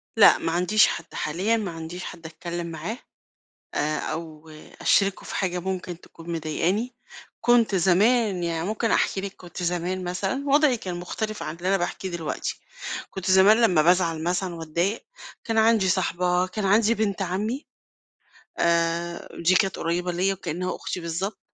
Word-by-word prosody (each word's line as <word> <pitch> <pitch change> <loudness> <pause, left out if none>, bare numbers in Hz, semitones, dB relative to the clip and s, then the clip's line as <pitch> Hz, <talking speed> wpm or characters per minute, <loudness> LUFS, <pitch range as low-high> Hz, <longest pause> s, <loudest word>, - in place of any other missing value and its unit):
لأ، - - +8
ما 165 - -2
عنديش 180 +6 +4
حد 170 - -5
حاليًا. 190 +9 0
ما 205 -5 -3
عنديش 165 +2 -7
حد 170 -2 -9
اتكلم 170 +1 -5
معاه 165 +9 -5 0.8
آآ، 155 +1 0
أو 160 -1 -6 0.3
أشرِكُه 195 -1 +2
في - - -6
حاجة 180 -2 -1
ممكن 180 -1 -4
تكون 165 +1 -10
مضايقاني. 175 +9 -1 0.5
كنت 240 -3 +4
زمان 195 +2 +3
يعني 165 0 -1
ممكن 220 +1 -1
أحكي 195 - +2
لِك 200 0 -6
كنت 180 0 -9
زمان 180 +1 -1
مثلًا، 195 +10 -2
وضعي 285 -2 +4
كان 185 -5 -5
مختلف 215 +5 -4
عن 155 +2 -5
اللي 180 +2 -3
أنا 195 - +4
باحكيه 190 +1 -3
دلوقتي. 170 -3 -4 0.5
كنت 190 -1 -3
زمان 190 +3 +7
لمّا 180 -9 +4
بازعل 170 -1 +3
مثلًا 175 +1 -1
واتضايق، 170 +6 -2 0.4
كان 225 -1 0
عندي 220 -3 +4
صاحبة، 180 -1 +1
كان 200 +3 -4
عندي 215 +3 +4
بنت 205 -3 -1
عمي 210 - -2 0.9
آآ، 170 0 +1 0.2
دي 175 +2 +5
كانت 195 -1 +2
قريبة 175 +2 -1
ليّا 185 +3 +1
وكإنّها 180 -1 -3
أختي - - -5
بالضبط، 175 +5 -3
180 Hz, 155 wpm, -25 LUFS, 170-200 Hz, 0.9 s, لأ